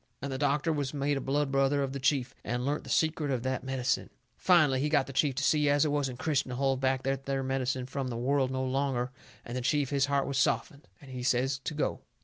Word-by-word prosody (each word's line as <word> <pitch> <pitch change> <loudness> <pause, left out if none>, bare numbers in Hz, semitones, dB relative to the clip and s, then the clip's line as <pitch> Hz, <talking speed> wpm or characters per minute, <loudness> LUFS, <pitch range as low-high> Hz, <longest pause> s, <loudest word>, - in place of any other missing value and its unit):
And 140 - -4
the 130 - -4
doctor 145 +3 +1
was 145 -1 -2
made 145 +1 0
a 135 - -2
blood 140 +1 0
brother 135 +1 +2
of 135 -1 -3
the 140 - -4
chief, 130 -2 +1
and 125 +1 -2
learnt 145 +2 -1
the - - -9
secret 155 -2 +1
of 125 -3 -1
that 130 -1 -2
medicine. 130 -1 -1 0.3
Finally 155 -8 +4
he 150 - +1
got 150 -3 +3
the 135 - -9
chief 135 0 +2
to 145 - -1
see 150 0 +3
as 145 +1 +4
it 150 - 0
wasn't 135 -4 -1
Christian 140 -2 0
to 125 - -4
hold 135 0 +1
back 130 0 +1
that 135 0 -2
there 135 -1 -1
medicine 130 -1 -1
from 135 +1 -4
the 120 -2 -4
world 130 +2 +1
no 130 0 -2
longer, 130 -1 -1 0.3
and 120 - -6
the 125 - -2
chief, 145 +2 +1
his 140 -1 +2
heart 140 -1 +1
was 140 -1 -1
softened, 140 +1 0
and 140 -2 -12
he 125 -1 -5
says 130 +2 +1
to 150 +3 -5
go. 150 - -1
135 Hz, 255 wpm, -30 LUFS, 130-145 Hz, 0.3 s, Finally